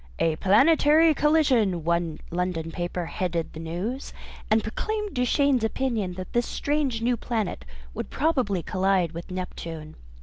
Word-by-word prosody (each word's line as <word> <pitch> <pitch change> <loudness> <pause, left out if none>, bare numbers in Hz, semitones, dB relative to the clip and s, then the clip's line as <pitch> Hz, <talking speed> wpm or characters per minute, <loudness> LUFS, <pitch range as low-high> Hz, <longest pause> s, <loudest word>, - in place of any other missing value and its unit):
"A 160 -1 +1
Planetary 300 - +5
Collision," 260 - +2
one 170 -1 0
London 170 -2 -2
paper 175 +1 -3
headed 170 -1 -3
the 160 - -8
news, 180 - -4 0.4
and 220 0 +3
proclaimed 420 - -3
Duchaine's 255 0 +2
opinion 220 -5 -1
that 185 0 -8
this 240 0 +1
strange 285 -6 -1
new 245 +1 +2
planet 220 - -3 0.3
would - - -5
probably 255 - 0
collide 185 -3 +1
with 170 +1 -8
Neptune. 165 -4 -6
205 Hz, 135 wpm, -26 LUFS, 175-265 Hz, 0.4 s, Planetary